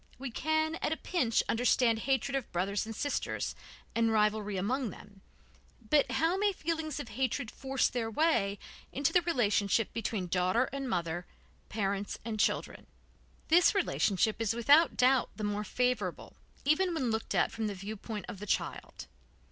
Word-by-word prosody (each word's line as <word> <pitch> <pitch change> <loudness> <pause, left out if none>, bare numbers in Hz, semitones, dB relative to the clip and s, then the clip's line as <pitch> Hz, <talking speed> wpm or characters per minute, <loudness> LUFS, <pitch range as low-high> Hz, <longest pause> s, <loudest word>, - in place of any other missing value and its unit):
We 260 -1 -5
can, 315 +5 0
at - - 0
a 320 - 0
pinch, 255 -11 +1
understand 230 -1 +2
hatred 270 +1 +1
of 270 -3 -3
brothers 195 +4 -1
and 225 - -6
sisters, 285 +6 -2 0.4
and 230 -1 +2
rivalry 210 -2 +1
among 240 +6 -1
them, 200 0 -13 0.7
but 280 -4 +4
how 325 +6 +2
may 410 0 +2
feelings 320 -4 -3
of 225 - -6
hatred 250 +1 -2
force 270 -1 0
their 230 -3 -2
way 215 -7 +1 0.3
into 280 0 0
the 355 - +5
relationship 225 - +1
between 220 -4 -2
daughter 180 +6 +2
and 275 -2 -3
mother, 175 -3 -2 0.4
parents 200 -1 -2
and 220 -2 -3
children? - - -1 0.6
This 350 +5 +5
relationship 220 - +1
is 225 0 0
without 290 +8 +5
doubt 255 0 +4
the 215 - -6
more 205 0 -1
favorable, 250 +3 -2 0.3
even 340 +4 +2
when 260 -7 0
looked 220 0 -2
at - - +2
from 220 -1 -2
the 205 - -4
viewpoint 210 +1 -6
of 200 - -7
the 210 - -7
child. - - -3
230 Hz, 160 wpm, -31 LUFS, 210-280 Hz, 0.7 s, the